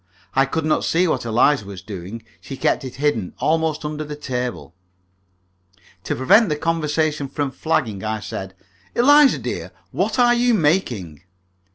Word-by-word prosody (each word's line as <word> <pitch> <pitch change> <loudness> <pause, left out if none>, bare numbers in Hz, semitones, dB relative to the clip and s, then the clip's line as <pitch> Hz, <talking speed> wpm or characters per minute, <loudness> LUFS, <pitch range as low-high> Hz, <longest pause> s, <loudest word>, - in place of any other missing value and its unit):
I 135 +1 +3
could 155 +3 -2
not 155 - +1
see 180 +2 +2
what 160 - -1
Eliza 120 +2 +3
was 100 -2 -9
doing. 100 +2 -8 0.2
She 135 - -8
kept - - +1
it 130 -1 -7
hidden, 145 -9 -1
almost 160 -1 0
under 150 0 -3
the 150 0 -6
table. 125 - -4 1.3
To - - -1
prevent 200 - +4
the 150 - 0
conversation 155 -2 -1
from 140 0 -3
flagging, 120 -11 -1
I 110 0 -2
said, 95 -2 -7 0.4
"Eliza, 290 +3 +6
dear, - - -5 0.2
what - - -1
are 240 -1 +5
you 240 0 +3
making?" 125 - 0
150 Hz, 155 wpm, -21 LUFS, 115-160 Hz, 1.3 s, Eliza